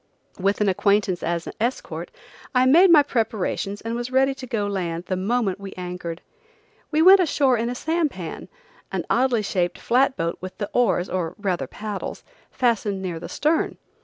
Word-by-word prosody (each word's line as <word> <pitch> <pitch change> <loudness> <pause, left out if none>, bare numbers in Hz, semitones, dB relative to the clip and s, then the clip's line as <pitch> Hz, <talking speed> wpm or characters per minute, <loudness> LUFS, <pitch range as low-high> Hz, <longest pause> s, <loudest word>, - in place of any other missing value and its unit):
With 200 +3 +1
an 210 - +3
acquaintance 195 -1 +2
as 170 0 -2
escort, 240 +4 -3 0.5
I 250 0 +5
made 340 +8 +7
my 310 -4 +8
preparations 215 -5 -2
and 225 0 -4
was 240 +1 -3
ready 265 +1 +3
to 265 -1 -9
go 215 -3 -1
to 200 - -3
land 170 -2 -3
the 185 - -2
moment 200 0 0
we 200 -1 -8
anchored. 180 -2 -6 0.7
We 315 +1 +2
went 385 +2 +9
ashore 285 -7 +3
in 235 +1 -1
a 245 - -3
Sampan, 300 - -2 0.4
an - - -2
oddly 245 -3 +2
shaped 180 -3 -1
flat 260 +2 +2
boat 165 0 -2
with 185 0 -7
the 205 - -4
oars, 190 -7 +2
or 180 -2 -3
rather 190 -4 -2
paddles, 210 -2 -6 0.3
fastened 210 -5 0
near 175 -3 -3
the - - -8
stern. 310 +2 0
210 Hz, 175 wpm, -23 LUFS, 185-255 Hz, 0.7 s, went